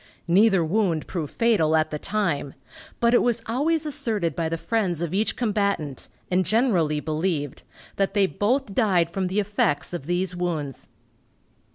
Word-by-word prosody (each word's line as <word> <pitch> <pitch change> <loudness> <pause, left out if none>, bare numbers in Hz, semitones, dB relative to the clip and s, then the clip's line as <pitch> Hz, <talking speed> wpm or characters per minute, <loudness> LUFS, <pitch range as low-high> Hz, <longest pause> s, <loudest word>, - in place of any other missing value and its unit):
Neither 190 0 +4
wound 175 -3 0
proved 160 -6 -4
fatal 200 -10 +2
at 155 0 +1
the 150 - -3
time, 170 -10 -2 0.4
but 235 0 +3
it 240 - +5
was 235 -1 +1
always 300 +7 0
asserted 225 - -1
by 165 -1 -1
the 165 - -2
friends 180 -4 -1
of 170 0 -3
each 205 +1 0
combatant, 200 - -1 0.2
and 185 +1 +3
generally 185 - +2
believed, 155 -2 -2 0.4
that 195 0 0
they 200 -1 +4
both 205 - -1
died 185 -8 +2
from 190 +1 -1
the 190 +3 0
effects 200 -7 0
of 160 -5 -5
these 180 +1 0
wounds. 160 -7 -3
185 Hz, 160 wpm, -24 LUFS, 160-220 Hz, 0.4 s, it